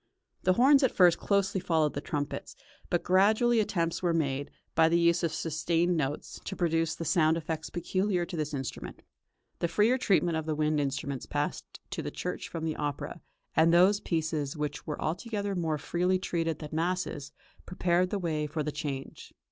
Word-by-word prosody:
The 185 - +3
horns 270 +6 +6
at 260 - +3
first 175 -2 +5
closely 200 -1 +1
followed 160 -4 +1
the 145 - -3
trumpets, 145 -1 -4 0.3
but 175 - 0
gradually 215 +6 +4
attempts 170 -6 0
were 175 -2 +1
made, 140 -3 -1 0.2
by 160 0 +5
the 170 - +3
use 170 0 +3
of 170 -2 0
sustained 165 +3 0
notes, 145 -2 -3
to 195 - -4
produce 165 -2 +1
the 165 - -5
sound 160 0 +3
effects 160 -1 -4
peculiar 180 +1 -1
to 175 +1 -7
this 155 -2 -2
instrument. 125 - -6 0.6
The 170 - +1
freer 215 +9 +3
treatment 175 -7 +2
of 160 0 -4
the 155 - 0
wind 155 0 +1
instruments 140 -1 -3
passed - - -3
to - - -3
the - - -4
church - - -4
from 165 -1 -4
the 155 - -2
opera, 145 -2 -4 0.3
and 160 +2 +5
those 185 +4 +5
pieces 160 -4 -2
which 150 -1 -4
were 150 - -3
altogether 205 +4 -2
more 165 -4 -1
freely 180 +5 0
treated 165 -4 -2
than 150 -1 -8
masses, 165 -3 -2 0.4
prepared 180 0 +1
the 205 - -1
way 155 -5 -1
for 155 +1 -3
the 150 - -2
change. 140 -2 -6
165 Hz, 180 wpm, -29 LUFS, 155-180 Hz, 0.6 s, horns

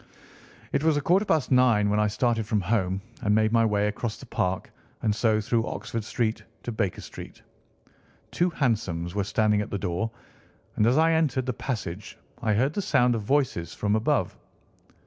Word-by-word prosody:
It 140 - +1
was 160 -2 +3
a - - 0
quarter 185 +8 +3
past 155 -9 +1
nine 125 -5 +4
when 105 - +2
I 105 - +3
started 115 0 0
from 105 -1 +1
home 95 -1 0 0.2
and 105 -3 +2
made 110 0 +3
my 115 0 +4
way 105 -2 +2
across 105 +1 -3
the - - -11
Park, 95 -5 -2 0.3
and 105 - +2
so 110 0 +2
through 115 +2 0
Oxford 115 -1 -4
Street 110 0 -1 0.2
to 120 - -4
Baker 105 -5 -2
Street. - - -10 0.9
Two 175 +1 +1
hansoms 100 - -1
were 100 0 0
standing 105 +1 +2
at 105 - -5
the 100 - -2
door, 95 +3 -2 0.7
and 105 - +3
as 125 +4 +3
I 165 +1 +4
entered 140 -5 +1
the 125 - -1
passage 105 -7 -5 0.2
I 110 -2 +1
heard 130 +7 +1
the 205 - -1
sound 125 -9 +3
of 115 - -1
voices 120 -7 0
from 105 0 0
above. 110 - 0
110 Hz, 185 wpm, -26 LUFS, 105-125 Hz, 0.9 s, nine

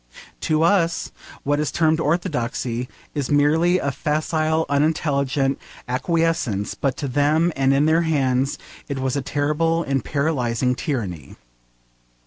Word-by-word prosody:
To 155 0 +1
us, 170 -2 +2 0.3
what 145 +1 +1
is 150 - -1
termed 160 -1 +2
orthodoxy 130 -7 -1 0.2
is 145 -4 -2
merely 155 +5 +3
a 140 -6 -1
facile 155 +2 0
unintelligent 140 -2 +1 0.3
acquiescence; 130 - 0
but 135 -2 -2
to 140 - -3
them, 150 +5 +2
and 135 0 +2
in 140 +2 +3
their 160 +2 +4
hands, 135 -4 +1 0.3
it 140 - -2
was 130 0 -1
a 140 - 0
terrible 150 +5 0
and 135 -4 -1
paralysing 130 -4 0
tyranny. 105 - -4
145 Hz, 125 wpm, -22 LUFS, 130-160 Hz, 0.3 s, their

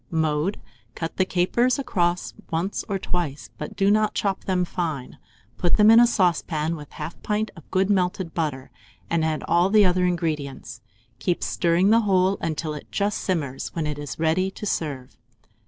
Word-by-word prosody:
Mode. 160 +3 0 0.4
Cut 165 -1 -5
the 185 - +3
capers 215 +8 +2
across 180 -10 0 0.2
once 170 +5 -2
or 200 - 0
twice, 175 -6 -3
but 150 - -6
do 195 0 +3
not 215 0 +2
chop 195 -2 -1
them 180 -2 +1
fine; 160 -7 -4 0.4
put 175 - +2
them 210 +1 +7
in 225 - +8
a 240 - +7
saucepan 170 -6 +1
with 150 -3 -10
1/2 155 +2 -8
pint 215 0 -1
of 165 - -15
good 190 0 +2
melted 185 -3 0
butter, 145 -6 -3 0.4
and 165 -1 +2
add 160 -1 -1
all 175 +2 +3
the 210 0 +6
other 180 0 +3
ingredients. 155 -6 -3 0.4
Keep 175 - -1
stirring 175 +4 +2
the 230 - +6
whole 190 -2 +2
until 155 -1 -2
it 150 - -9
just 205 0 0
simmers, 145 -8 -2
when 165 -2 -1
it 150 -1 -3
is 145 -1 -6
ready 165 +4 +1
to 200 - -8
serve. 140 -9 -3
175 Hz, 175 wpm, -24 LUFS, 155-195 Hz, 0.4 s, in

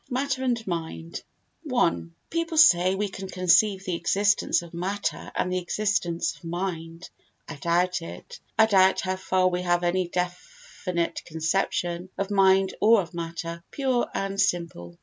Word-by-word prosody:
Matter 260 0 -1
and 240 -3 -1
Mind 160 - -5 0.5
i 85 - +2 0.3
People 335 -1 -2
say 185 - +6
we 205 +1 -1
can 190 0 -7
conceive 190 +2 +3
the 185 - -2
existence 200 +1 +1
of 170 - -13
matter 195 +4 -3
and 180 - -1
the 185 - +1
existence 180 -2 -1
of - - -23
mind. 170 -1 -5 0.4
I 160 - -7
doubt 175 +4 +1
it. 485 - -10 0.2
I 220 - +7
doubt 190 -3 +4
how 185 0 -2
far 185 0 +1
we 180 0 -2
have 175 -1 +1
any 175 +1 +1
definite 180 - -4
conception 175 +2 -1
of 195 +1 -3
mind 195 -1 +4
or 220 0 +6
of 170 - -14
matter, 170 0 -5
pure 260 -3 0
and 195 0 -1
simple. 170 - -2
185 Hz, 150 wpm, -26 LUFS, 170-200 Hz, 0.5 s, I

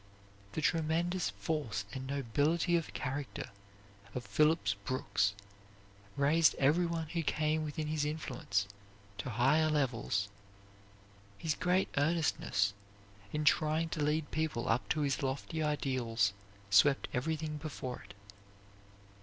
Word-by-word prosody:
The - - -2
tremendous 165 - +1
force 105 +2 -2
and 130 0 -5
nobility 145 +6 +1
of 165 -2 -1
character 135 -2 -4 0.6
of 125 -2 -3
Phillips 150 - +3
Brooks 100 -2 0 0.8
raised 155 +3 +4
everyone 165 +2 +2
who 170 0 -1
came 155 0 +1
within 155 +1 -3
his 155 -1 -1
influence 130 -9 -1 0.5
to 130 - -3
higher 135 +8 +3
levels. 120 -9 0 1.1
His 160 +5 0
great 180 +4 +2
earnestness 145 -9 +2 0.6
in 150 0 -1
trying 155 +2 +3
to 155 - -3
lead 150 +1 0
people 155 -6 -1
up 115 +2 +1
to 155 - +1
his 140 -3 0
lofty 140 +4 -2
ideals 130 -9 +1 0.4
swept 135 +8 +5
everything 155 +3 -1
before 140 -4 -5
it. - - -12
150 Hz, 115 wpm, -33 LUFS, 125-160 Hz, 1.1 s, swept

